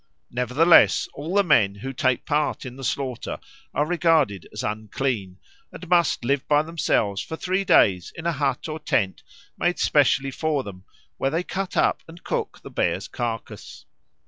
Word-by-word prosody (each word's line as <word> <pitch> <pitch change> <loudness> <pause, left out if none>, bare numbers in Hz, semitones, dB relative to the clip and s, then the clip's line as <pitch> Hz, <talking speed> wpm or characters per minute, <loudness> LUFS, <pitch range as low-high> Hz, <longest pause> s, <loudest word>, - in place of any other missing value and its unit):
Nevertheless, 125 +8 +4
all 160 +7 -5
the 200 - +5
men 105 - +3
who 135 +7 -6
take 130 0 0
part 150 -1 -1
in 125 -1 -7
the 135 - -10
slaughter 130 -2 -3 0.3
are 145 - 0
regarded 155 - +1
as - - -5
unclean, 110 -2 -3 0.3
and 180 - -10
must 170 -8 +2
live 140 +1 0
by 150 0 +4
themselves 115 -11 0
for 160 - -6
three 185 +4 -1
days 95 - +3
in 165 - -8
a 170 - +2
hut 145 +1 -1
or 155 0 -5
tent 100 -10 0 0.4
made 175 0 +1
specially 140 -1 +2
for 150 -1 -1
them, 95 -3 -10 0.3
where 135 - 0
they 165 +5 -1
cut 190 +1 -4
up - - +2
and 165 +1 -13
cook - - -3
the - - -10
bear's - - -1
carcase. 115 -2 -6
140 Hz, 170 wpm, -24 LUFS, 120-165 Hz, 0.4 s, the